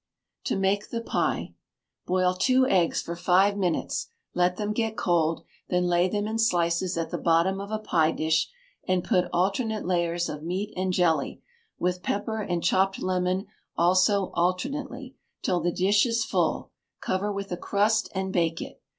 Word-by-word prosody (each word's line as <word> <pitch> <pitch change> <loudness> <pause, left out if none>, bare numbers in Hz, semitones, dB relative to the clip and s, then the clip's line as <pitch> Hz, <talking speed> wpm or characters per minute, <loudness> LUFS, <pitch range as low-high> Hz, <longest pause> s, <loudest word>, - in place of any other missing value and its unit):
To - - 0
make 195 +2 0
the 230 - -3
Pie. - - -1 0.5
Boil 185 0 +2
two 255 +7 +3
eggs 185 -10 +2
for 170 - -5
five 190 +3 +3
minutes; 180 -5 -1 0.3
let 180 0 +1
them 210 0 -2
get 220 0 -1
cold, 165 -2 +1 0.3
then 180 0 +1
lay 175 +1 +2
them 205 +1 -1
in 220 +1 -2
slices 175 -4 +1
at 165 -1 -2
the - - -2
bottom 170 +4 +2
of 200 - -7
a 215 - -1
pie 165 -7 +2
dish, 160 0 +1 0.4
and 185 -2 +1
put 185 -6 +2
alternate 210 +5 0
layers 175 -1 0
of 150 - -6
meat 185 +6 -3
and 185 0 -1
jelly, 175 -3 +1 0.3
with 180 0 -1
pepper 215 +3 -2
and 175 -4 -2
chopped 190 +1 +2
lemon 185 +1 0 0.3
also 185 +3 +3
alternately, 260 +9 -2 0.3
till 180 -2 +1
the 175 +1 0
dish 205 +6 +3
is 230 -1 0
full; - - -1 0.3
cover 195 +3 -1
with 200 -1 -5
a - - 0
crust 215 +4 +1
and 190 0 -2
bake 165 -2 +1
it. - - -8
185 Hz, 170 wpm, -26 LUFS, 175-205 Hz, 0.5 s, two